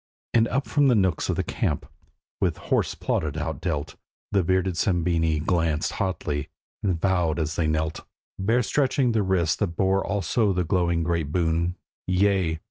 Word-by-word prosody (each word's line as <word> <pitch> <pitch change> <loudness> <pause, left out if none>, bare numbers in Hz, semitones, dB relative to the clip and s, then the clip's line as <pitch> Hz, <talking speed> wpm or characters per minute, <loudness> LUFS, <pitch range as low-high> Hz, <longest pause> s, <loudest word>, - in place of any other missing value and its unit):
And 115 -1 +4
up 135 +4 -1
from 145 -1 +2
the 125 - +5
nooks 95 -5 +1
of - - +1
the - - 0
camp, - - -2 0.5
with - - 0
hoarse - - 0
plaudit 75 -2 -1
outdealt, 80 -1 -3 0.3
The 100 - +3
bearded 95 +2 +1
Sabini 85 -4 +1
glanced 80 -3 +1
hotly, 75 -7 -2 0.3
and 95 -5 0
vowed 90 -4 +1
as 80 0 -2
they 80 - +1
knelt, 80 +1 -1 0.4
Bare 115 +6 +2
stretching 135 0 +1
the 110 -2 +2
wrists 95 -5 +1
that 85 - -2
bore 95 0 +2
also 100 +1 +1
the 90 0 0
glowing 85 -1 +1
great 85 -3 -1
boon: 85 +1 0 0.3
'Yea! 95 -3 +2
90 Hz, 160 wpm, -25 LUFS, 80-100 Hz, 0.5 s, the